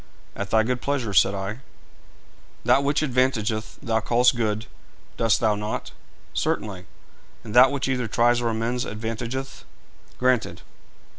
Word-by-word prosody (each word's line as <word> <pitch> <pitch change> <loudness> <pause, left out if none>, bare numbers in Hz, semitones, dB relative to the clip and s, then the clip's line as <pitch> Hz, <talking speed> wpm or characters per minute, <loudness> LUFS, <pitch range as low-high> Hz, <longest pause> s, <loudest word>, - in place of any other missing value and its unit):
'At 100 0 -4
thy 110 +1 +4
good 125 +1 -2
pleasure,' 135 -7 -2
said 95 +1 +4
I. 100 +4 -4 1.1
'That 140 - +4
which 145 +2 +1
advantageth 120 -5 0
thou 110 -1 +1
callest 125 +3 +3
good, 110 -2 -1 0.5
dost 115 -1 +2
thou 110 -2 +2
not?' 105 +1 -4 0.4
'Certainly.' 95 -4 -2 0.6
'And 110 - -8
that 125 +2 +7
which 140 -2 -2
either 125 -3 -1
tries 120 +2 +2
or 120 - 0
amends 115 +2 -1
advantageth?' 115 +5 -5 0.5
'Granted.' 125 -2 0
115 Hz, 135 wpm, -24 LUFS, 110-125 Hz, 1.1 s, that